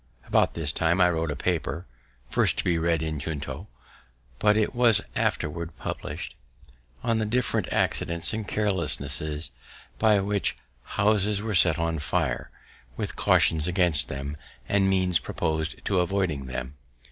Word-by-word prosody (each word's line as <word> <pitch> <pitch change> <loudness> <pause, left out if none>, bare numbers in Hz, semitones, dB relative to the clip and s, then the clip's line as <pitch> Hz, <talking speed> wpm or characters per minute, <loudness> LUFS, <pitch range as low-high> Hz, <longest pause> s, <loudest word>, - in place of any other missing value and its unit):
About - - +2
this 80 -3 +1
time 85 +2 +1
I 90 -1 +5
wrote 80 -1 -1
a 75 - -2
paper 85 +1 -2 0.4
(first - - +2
to - - -1
be 85 -2 +1
read 80 -1 +1
in 80 -2 -3
Junto, 75 +3 -5 0.7
but 105 0 +4
it 110 +3 +1
was 120 -4 +5
afterward 85 +2 -2
publish'd) - - -5 0.7
on 115 -1 +1
the 110 - 0
different 125 +3 0
accidents 85 +3 0
and 110 -2 -4
carelessnesses 80 -7 -1 0.5
by 110 -2 +4
which 100 0 0 0.4
houses 105 -1 +2
were 110 -1 -2
set 85 -3 +5
on 85 -1 -1
fire, 65 -4 -1 0.5
with - - -3
cautions 80 0 +3
against 90 -5 +3
them, 70 +2 -5 0.3
and 95 -1 +2
means 90 -3 +3
proposed 80 +3 -2
of 100 - 0
avoiding 90 -6 0
them. 65 +1 -5
85 Hz, 145 wpm, -26 LUFS, 75-100 Hz, 0.7 s, I